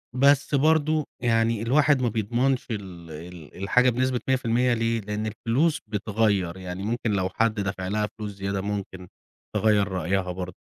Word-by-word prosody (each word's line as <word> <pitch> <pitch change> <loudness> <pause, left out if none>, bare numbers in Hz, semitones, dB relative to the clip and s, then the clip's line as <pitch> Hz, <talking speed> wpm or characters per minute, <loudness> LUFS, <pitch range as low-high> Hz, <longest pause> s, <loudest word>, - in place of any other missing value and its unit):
بس 140 +2 +4
برضه 155 +1 +3 0.2
يعني 115 -2 +2
الواحد 140 +3 +3
ما 120 - +2
بيضمنش 120 +4 0
ال 90 -6 -7
ال 80 0 -10
الحاجة 125 +5 +4
بنسبة 125 +1 0
100% 125 -1 +2
ليه، 115 0 0
لإن 105 +1 -3
الفلوس 130 +9 0
بتغير، 105 -4 0
يعني 90 0 -6
ممكن 115 +1 -1
لو 95 -2 0
حد 115 +2 +1
دفع 95 -2 -3
لها 105 +2 0
فلوس 105 -1 -4
زيادة 100 0 -3
ممكن 95 -2 -5 0.5
تغير 105 -2 +3
رأيها 95 0 -1
برضه، 90 0 -6
110 Hz, 150 wpm, -25 LUFS, 95-125 Hz, 0.5 s, بس